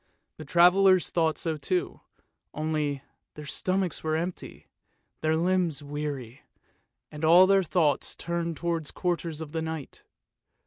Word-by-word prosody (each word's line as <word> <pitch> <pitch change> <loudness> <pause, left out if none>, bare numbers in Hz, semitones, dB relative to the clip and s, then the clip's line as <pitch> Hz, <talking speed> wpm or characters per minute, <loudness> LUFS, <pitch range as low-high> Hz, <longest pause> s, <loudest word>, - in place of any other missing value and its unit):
The - - -9
travellers 185 +1 +5
thought 160 -3 +1
so 160 -2 -2
too, 365 - -2 0.5
only 150 -3 -2
— - - -56
their 150 - -9
stomachs 185 +3 -1
were 155 0 0
empty, 170 +3 -5 0.6
their 155 0 +1
limbs 170 -4 0
weary, 145 -3 -5 0.7
and 150 +1 -8
all 170 +4 +7
their 195 0 +4
thoughts 160 -5 0
turned 170 -2 -3
towards 170 -3 -2
quarters 170 -3 -3
for - - -3
the 160 +2 -4
night. 160 -3 -6
160 Hz, 135 wpm, -27 LUFS, 150-175 Hz, 0.7 s, all